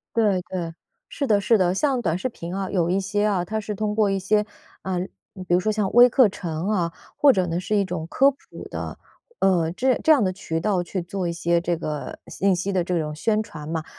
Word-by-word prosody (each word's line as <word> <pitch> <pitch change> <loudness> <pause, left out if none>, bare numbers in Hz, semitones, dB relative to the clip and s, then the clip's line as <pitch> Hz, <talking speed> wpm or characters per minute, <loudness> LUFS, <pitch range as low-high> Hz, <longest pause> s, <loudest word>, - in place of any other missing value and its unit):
对， 205 -5 +2
对， 170 -3 -4 0.3
是 285 - -3
的 210 -6 +3
是 220 +3 +3
的。 185 -2 +2
像 265 +3 +1
短 170 -5 0
视 220 - -2
频 175 -8 -7
啊， 195 -1 -3
有 175 -3 +1
一 190 +2 +2
些 205 +2 -1
啊， 195 -4 +1
它 220 +4 -2
是 210 0 -4
通 210 +1 -2
过 210 -2 +3
一 195 - 0
些， 210 +2 +1 0.4
嗯， 185 -1 -2 0.4
比 - - +1
如 175 - +5
说 215 - +1
像 210 -2 0
微 245 +1 +8
课 250 0 +5
程 170 -2 -4
啊， 175 -6 0 0.2
或 285 -2 +6
者 185 -5 +1
呢 170 +1 -1
是 210 +2 0
一 200 - +2
种 175 -3 -4
科 270 +10 +4
普 275 - -8 0.3
的， - - -6 0.4
呃， 175 -4 +2
这 255 +8 +1
这 320 - +5
样 290 - +6
的 185 -3 +1
渠 165 -4 -3
道 185 0 0
去 180 +2 -4
做 175 0 -3
一 - - -1
些 170 0 +1
这 175 -1 -1
个 150 -2 -5
信 195 0 +1
息 185 +2 -2
的 180 - +1
这 175 -1 -1
种 150 -1 -3
宣 215 +7 +1
传 160 -9 -8
嘛。 160 -1 -3
190 Hz, 255 characters per minute, -23 LUFS, 175-210 Hz, 0.4 s, 微